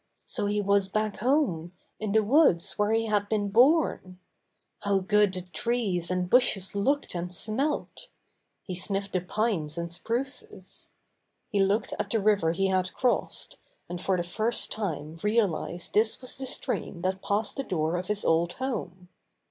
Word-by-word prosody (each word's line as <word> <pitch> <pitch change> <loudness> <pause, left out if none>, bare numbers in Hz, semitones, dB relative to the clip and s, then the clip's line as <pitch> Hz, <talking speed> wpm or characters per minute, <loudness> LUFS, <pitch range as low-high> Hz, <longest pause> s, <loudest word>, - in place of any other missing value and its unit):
So 205 - -2
he 205 0 0
was 200 -1 +2
back 215 0 -1
home, 210 - +1 0.3
in 215 -2 -2
the 220 0 +4
woods 220 - +3
where 215 +2 +3
had 205 -1 0
been 205 -2 0
born! 240 - +3 0.6
How 200 -1 +1
good 205 +1 +3
the 185 -1 -5
trees 185 -2 -1
and 180 0 0
bushes 195 -4 +3
looked 275 +9 0
and 175 0 -4
smelt! 235 - 0 0.6
He 185 - -6
sniffed 195 +2 -1
the 185 - +2
pines 180 -5 -1
and 170 0 -3
spruces. 240 +9 -5 0.6
He 205 -4 0
looked 195 +3 +1
at 210 -1 -2
the 225 - +1
river 200 -5 +3
he 195 +3 0
had 185 -1 0
crossed, 250 -2 0 0.3
and 175 0 -5
for 190 -1 +1
the 175 - -1
first 215 +7 0
time 165 -6 -4
realized 205 -5 0
this 220 +1 +2
was 255 - -4
the 265 0 -4
stream 175 -7 -3
that 190 +1 -1
passed 205 +1 0
the 275 - -1
door 165 -6 -1
of 180 +1 -3
his 210 -1 -2
old 170 +1 +2
home. 185 -9 -4
200 Hz, 165 wpm, -27 LUFS, 180-220 Hz, 0.6 s, the